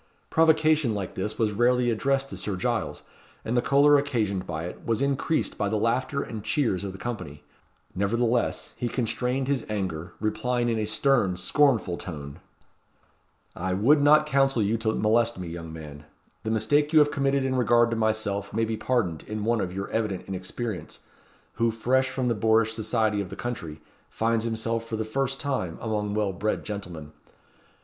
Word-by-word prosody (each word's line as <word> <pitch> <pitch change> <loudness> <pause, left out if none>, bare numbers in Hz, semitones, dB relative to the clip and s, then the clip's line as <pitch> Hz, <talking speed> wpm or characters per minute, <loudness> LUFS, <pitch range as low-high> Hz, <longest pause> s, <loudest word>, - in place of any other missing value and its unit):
Provocation 155 -6 +3
like 100 -3 -4
this 105 +3 -3
was 110 -2 +1
rarely 120 +3 +2
addressed 135 +4 0
to - - -5
Sir 105 - -2
Giles; 90 - -2 0.4
and 115 - -1
the 120 - +4
choler 145 +2 +5
occasioned 110 -10 -1
by 80 -2 -4
it 90 - -7
was 115 -2 0
increased 140 +3 0
by 100 -1 +1
the 110 - 0
laughter 130 +6 0
and 110 -3 -7
cheers 115 - 0
of 100 - -4
the 95 - -10
company. 90 -9 -6 0.5
Nevertheless 115 +5 0
he 120 - -2
constrained 125 +2 -1
his 140 -4 0
anger, 90 -5 -3
replying 120 +3 0
in 115 -1 0
a 105 - 0
stern, 110 -5 +2
scornful 115 - +2
tone 75 -3 -7 1.2
"I 90 +1 -2
would 140 +10 +4
not 150 +1 +6
counsel 135 -5 +2
you 105 +3 +1
to 110 -1 0
molest 115 +1 +2
me, 90 -2 -5
young 85 -1 -7
man. 75 -2 -9 0.4
The 110 - -4
mistake 145 +7 +2
you 160 - +4
have 145 -1 +6
committed 140 -1 +1
in 130 - 0
regard 120 -1 +4
to - - 0
myself 110 -3 -1
may 115 +1 +1
be 110 0 -3
pardoned 105 -13 0
in 105 0 -3
one 115 -1 +2
of 90 - -2
your 95 +2 -4
evident 105 -5 -2
inexperience; 95 +3 -5 0.6
who, 115 - +4
fresh 130 +4 +1
from 130 -1 -2
the 120 - +2
boorish 110 +1 +2
society 110 -2 0
of 95 - -6
the 95 - -7
country, 85 -11 -5 0.3
finds 115 0 0
himself, 115 0 -1
for 115 -1 -5
the 110 0 -2
first 135 +4 -1
time, 130 - -2
amongst 105 -2 -2
well 105 -2 0
bred 105 +4 -2
gentlemen. 90 -8 -6
110 Hz, 180 wpm, -26 LUFS, 100-125 Hz, 1.2 s, not